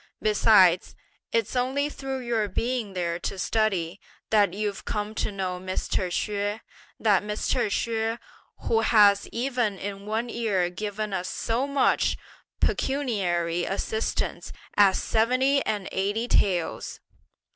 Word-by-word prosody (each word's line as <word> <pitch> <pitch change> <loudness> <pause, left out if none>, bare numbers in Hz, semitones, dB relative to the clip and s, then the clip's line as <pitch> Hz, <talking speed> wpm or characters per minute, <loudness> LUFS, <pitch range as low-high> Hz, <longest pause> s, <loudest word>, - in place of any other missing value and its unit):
Besides, 205 -4 +4 0.4
it's 230 +1 0
only 265 +3 +1
through 270 -2 -5
your 230 -3 0
being 230 0 -2
there 170 -2 -2
to 195 - -4
study, 195 -4 0 0.3
that 210 -2 +4
you've 205 0 -3
come 210 0 -3
to 215 - -2
know 185 -2 -3
Mr. 185 0 -2
Hsüeh! 205 +3 -2 0.4
that 205 -4 +3
Mr. 215 +3 -1
Hsüeh, 225 +2 -1 0.4
who 225 - +1
has 205 -3 +5
even 240 -4 -1
in 200 +1 -6
one 220 +3 -1
year 205 -7 0
given 210 +2 -4
us 185 0 -2
so 240 +5 -1
much 280 -1 +2 0.4
pecuniary 180 -11 0
assistance 220 +4 -2 0.2
as 200 -2 +5
seventy 255 +5 +2
and 205 -3 -1
eighty 205 +5 -1
taels! 180 -7 0
210 Hz, 125 wpm, -26 LUFS, 195-230 Hz, 0.4 s, has